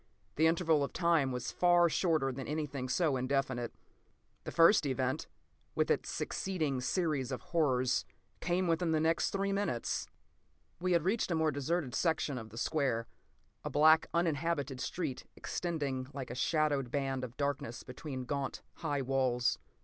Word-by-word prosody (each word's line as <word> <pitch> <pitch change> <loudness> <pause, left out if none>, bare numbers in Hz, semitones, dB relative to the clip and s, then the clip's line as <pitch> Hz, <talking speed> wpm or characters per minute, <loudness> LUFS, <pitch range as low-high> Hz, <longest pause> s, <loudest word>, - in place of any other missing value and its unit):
The 160 +2 +4
interval 160 -3 +3
of 140 - -4
time 165 -6 +2
was 125 -1 -3
far 175 -1 +4
shorter 160 -5 +1
than 130 0 -6
anything 145 -4 -3
so 150 -1 +2
indefinite. 130 -2 -1 0.7
The - - -4
first 165 -1 +5
event, 130 -1 -1 0.5
with - - +2
its - - 0
succeeding 155 -9 -2
series 140 -3 0
of 130 - -3
horrors, 130 -6 +2 0.4
came 180 +1 0
within 165 0 +1
the 155 - +3
next 165 +1 +2
three 195 0 -1
minutes. 195 - -1 0.7
We 180 +1 +1
had 170 -2 +3
reached 200 +5 +1
a 170 - +1
more 160 -1 +2
deserted 145 0 -1
section 155 -5 0
of 110 -1 -9
the 110 - -12
square, 130 -5 0 0.6
a - - -3
black, 155 +2 +5
uninhabited 160 -5 0
street 160 -8 -3
extending 145 -7 -3
like 130 -3 -5
a - - -3
shadowed 145 -1 +1
band 135 -1 -1
of 125 -1 -7
darkness 140 -5 -2
between 130 0 -6
gaunt, 140 +1 -3
high 145 -4 -1
walls. 130 -2 +1
145 Hz, 155 wpm, -33 LUFS, 130-165 Hz, 0.7 s, first